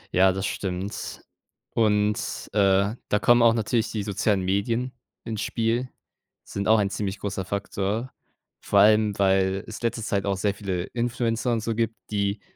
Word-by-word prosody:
Ja, 95 +1 +6
das 95 +1 -3
stimmt, 95 +1 -4 0.5
und, 105 -1 +2 0.3
äh, 100 +1 +3
da 105 - +2
kommen 120 +2 +5
auch 115 0 +5
natürlich 115 +1 0
die 105 -3 -2
sozialen 100 -1 0
Medien 115 +6 0 0.3
ins 110 -2 -3
Spiel, 120 +2 -1 0.5
sind 100 +1 -4
auch 110 0 +6
ein 100 -1 0
ziemlich 100 -1 -3
großer 95 -2 -3
Faktor, 100 +4 -3 0.5
vor 100 - 0
allem, 105 0 +5
weil 95 0 +2
es 110 - -8
letzte 115 -1 -1
Zeit 100 -2 -1
auch 95 -1 0
sehr 100 0 0
viele 95 -3 -3
Influencer 120 +1 -1
und 115 - 0
so 115 +1 -1
gibt, 115 0 -1 0.2
die 100 0 -1
105 Hz, 160 wpm, -25 LUFS, 100-115 Hz, 0.5 s, Ja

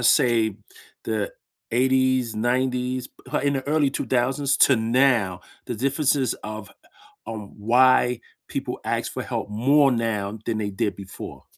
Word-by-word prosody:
say 120 -4 +3 0.5
the 110 -2 -1 0.4
'80s, 130 -1 +2
'90s, 125 +2 0
p 145 +2 -4
in 140 - +3
the 135 0 -3
early 150 -2 +2
2000s, 135 +2 0
to 135 - +4
now, 115 -5 +2 0.3
the 120 - -3
differences 135 +1 +1
of 110 -1 -7 0.6
on 105 -3 -7
why 125 +2 +4 0.3
people - - -4
ask - - -2
for - - -4
help - - -4
more 135 +7 +4
now 110 -3 -1
than 115 - -1
they 105 -1 -2
did 100 -1 -2
before? 100 -1 -9
125 Hz, 135 wpm, -24 LUFS, 110-130 Hz, 0.6 s, to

